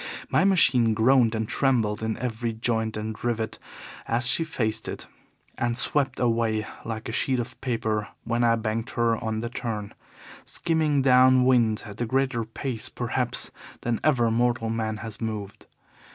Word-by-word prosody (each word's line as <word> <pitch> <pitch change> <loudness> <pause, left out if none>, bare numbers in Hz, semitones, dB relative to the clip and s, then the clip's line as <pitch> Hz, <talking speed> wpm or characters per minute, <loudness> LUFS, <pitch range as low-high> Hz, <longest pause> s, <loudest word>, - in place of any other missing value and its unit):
My - - +3
machine 125 - +4
groaned 120 0 +4
and 110 -1 -2
trembled 115 -7 +1
in 110 0 -2
every 120 -1 -3
joint 110 -1 -1
and 110 0 -5
rivet 115 -2 -2 0.5
as 120 +2 +2
she 165 - +2
faced 115 -8 -2
it, - - -5 0.5
and 120 0 0
swept 140 +1 +2
away 115 -2 +1 0.2
like 110 -1 -5
a - - -4
sheet 130 +2 +1
of 120 +1 -6
paper 110 -4 -1 0.2
when 120 +1 0
I 115 -1 +4
banked 115 +1 -3
her 115 -1 +2
on 110 -1 -2
the 120 - -3
turn, 110 -4 -5 0.5
skimming 155 -4 +2
down 130 -1 +6
wind 115 -4 +3
at 105 +2 -9
a 120 - 0
greater 130 -1 0
pace, 115 0 -4
perhaps, 120 0 -1 0.3
than 115 -2 -1
ever 120 -7 +3
mortal 120 -1 +1
man 110 -1 -2
has 110 -1 -6
moved. 105 -3 -5
115 Hz, 160 wpm, -25 LUFS, 110-125 Hz, 0.5 s, down